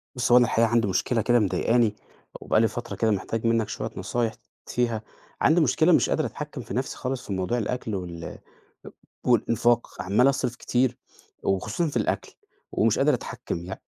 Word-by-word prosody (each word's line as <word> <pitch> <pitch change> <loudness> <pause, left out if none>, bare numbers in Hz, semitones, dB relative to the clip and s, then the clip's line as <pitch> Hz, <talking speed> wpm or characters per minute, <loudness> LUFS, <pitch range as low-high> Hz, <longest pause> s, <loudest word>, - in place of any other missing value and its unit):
بُصّ 125 -1 0
هو 120 - +9
أنا 125 - +6
الحقيقة 115 0 +2
عندي 115 -1 +2
مشكلة 105 +5 +1
كده 120 +2 +3
مضايقاني 105 +3 +2 0.5
وبقى 110 - +2
لي 115 - +4
فترة 120 +3 -6
كده 110 -1 +1
محتاج 110 +3 -2
منك 115 -2 +1
شوية - - -4
نصايح 115 -2 -1 0.3
فيها، 115 -3 -1 0.4
عندي 165 +3 +4
مشكلة 155 +4 +3
مش - - +4
قادر 155 - +1
أتحكم 150 -3 -6
في 115 - -8
نَفسي 130 +2 -2
خالص 130 0 -4
في 100 - -3
موضوع 95 +5 -1
الأكْل 115 -1 -2
وال 85 -3 -6 0.9
والإنفاق، 120 -2 +2
عمّال 105 +9 +3
أصرف 125 -3 -1
كتير 125 0 0 0.5
وخصوصًا 100 - 0
في 140 - -2
الأكْل 110 - -2 0.4
ومش - - +2
قادر - - +4
أتحكم، 85 - -4
يع 95 - -6
115 Hz, 175 wpm, -25 LUFS, 105-125 Hz, 0.9 s, هو